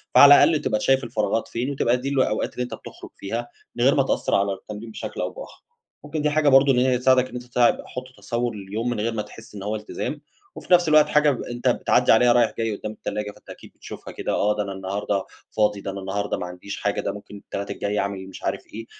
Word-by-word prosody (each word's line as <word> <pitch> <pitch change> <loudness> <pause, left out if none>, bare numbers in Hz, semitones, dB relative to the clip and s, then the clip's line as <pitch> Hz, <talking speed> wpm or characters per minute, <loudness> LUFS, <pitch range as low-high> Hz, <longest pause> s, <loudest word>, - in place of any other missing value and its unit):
فعلى 145 0 +9
الأقل 155 +1 +3
تبقى 110 - 0
ت - - -8
شايف 135 0 +3
الفراغات 115 -2 -1
فين 120 +3 -3
وتبقى 125 -3 +1
دي 130 +2 -4
الأوقات 130 -6 0
اللي 125 - -2
أنت 125 - -6
بتخرج - - -10
فيها 115 +4 -4 0.3
من 120 - 0
غير 135 +2 +5
ما 140 - +4
تأثر - - 0
على 100 0 +1
التمرين 105 +3 -9
بشكل - - -6
أو - - -1
بآخر. - - -11 0.4
ممكن 150 +1 -4
دي 150 - +2
حاجة 150 0 +3
برضه 135 +1 +6
إن 125 - +2
هي 130 0 +3
تساعدك 130 0 +3
إن - - -15
أنت 125 - -5
تع 125 -1 +3
حُط 125 - -6
تصور 115 +3 -2
لليوم 105 +4 -4
من 120 -3 -2
غير 115 +2 -1
ما 110 - -1
تحس 105 +1 -12
إن 100 - -7
هو 105 +2 -2
التزام، 125 +7 -5 0.3
وفي - - -1
نفس 175 -1 +5
الوقت 155 0 +6
حاجة 150 0 +4
ب 130 - -4
أنت 120 0 -4
بتعدّي - - +3
عليها 120 +2 +6
رايح 120 -2 +3
جاي 115 -2 -1
قُدّام 105 - -6
التلاجة 105 -1 -4
فأنت - - -21
أكيد - - -11
بتشوفها - - -10
كده، - - -3
آه، 105 +1 +2
ده 105 - -1
أنا 100 - -6
النهارده 95 +1 -2 0.3
فاضي، 105 -2 +2
ده 100 - -4
أنا 100 - -6
النهارده 100 +1 -2
ما - - -4
عنديش 90 +3 -7
حاجة، 100 0 0
ده - - -2
ممكن 105 0 -10
التلات 100 0 -6
الجاي 105 0 -2
أعمل 100 -1 -3
مش 95 - -11
عارف - - -2
إيه، 115 +1 -7
115 Hz, 245 wpm, -23 LUFS, 100-130 Hz, 0.4 s, فعلى